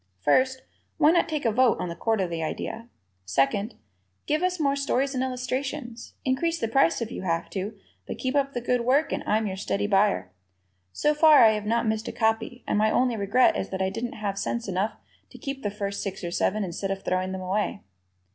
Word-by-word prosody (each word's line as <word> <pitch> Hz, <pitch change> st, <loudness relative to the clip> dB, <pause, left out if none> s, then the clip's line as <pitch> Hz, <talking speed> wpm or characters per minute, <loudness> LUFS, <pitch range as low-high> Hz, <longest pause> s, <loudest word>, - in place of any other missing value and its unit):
First, 260 Hz, -, +2 dB, 0.3 s
why 300 Hz, -, +5 dB
not 345 Hz, -1 st, +2 dB
take 305 Hz, -4 st, -2 dB
a 230 Hz, -, +3 dB
vote 250 Hz, +2 st, +3 dB
on -, -, -2 dB
the 170 Hz, -, -5 dB
quarterly 185 Hz, -5 st, -1 dB
idea? 225 Hz, +8 st, -4 dB, 0.3 s
Second, 135 Hz, -, 0 dB, 0.5 s
give 305 Hz, +1 st, 0 dB
us 365 Hz, -1 st, 0 dB
more 280 Hz, -2 st, +2 dB
stories 275 Hz, 0 st, 0 dB
and 255 Hz, -1 st, 0 dB
illustrations. 255 Hz, -1 st, -4 dB
Increase 330 Hz, +6 st, 0 dB
the 225 Hz, -, -1 dB
price 230 Hz, -3 st, +2 dB
if 230 Hz, -, -7 dB
you -, -, -5 dB
have 170 Hz, -2 st, -2 dB
to, 205 Hz, +2 st, -4 dB, 0.3 s
but -, -, -5 dB
keep 260 Hz, 0 st, -2 dB
up 280 Hz, -1 st, +1 dB
the 245 Hz, -, -3 dB
good 245 Hz, 0 st, +1 dB
work 270 Hz, +6 st, +2 dB
and -, -, -2 dB
I'm 215 Hz, +1 st, +2 dB
your 190 Hz, -2 st, -3 dB
steady 200 Hz, +1 st, -1 dB
buyer. 200 Hz, -, +2 dB, 0.6 s
So 300 Hz, -, +1 dB
far 300 Hz, -2 st, +7 dB
I 220 Hz, -, +7 dB
have 210 Hz, -1 st, -3 dB
not 230 Hz, +1 st, +1 dB
missed 220 Hz, 0 st, -1 dB
a -, -, -2 dB
copy, 225 Hz, +2 st, -1 dB
and 210 Hz, -, +1 dB
my 215 Hz, +1 st, +3 dB
only 250 Hz, +1 st, +2 dB
regret 210 Hz, +5 st, +3 dB
is -, -, -3 dB
that 190 Hz, -, -4 dB
I 190 Hz, -, 0 dB
didn't 230 Hz, +4 st, -4 dB
have 200 Hz, -2 st, -3 dB
sense 235 Hz, -2 st, -2 dB
enough 195 Hz, +3 st, -1 dB, 0.4 s
to -, -, -13 dB
keep 275 Hz, -1 st, -5 dB
the 205 Hz, -, -1 dB
first 200 Hz, 0 st, -4 dB
six 195 Hz, -2 st, -5 dB
or 170 Hz, -, -3 dB
seven 210 Hz, +4 st, 0 dB
instead 190 Hz, +2 st, -4 dB
of 195 Hz, 0 st, -3 dB
throwing 185 Hz, 0 st, 0 dB
them 190 Hz, 0 st, -4 dB
away. 185 Hz, -, -2 dB
225 Hz, 215 wpm, -26 LUFS, 195-260 Hz, 0.6 s, far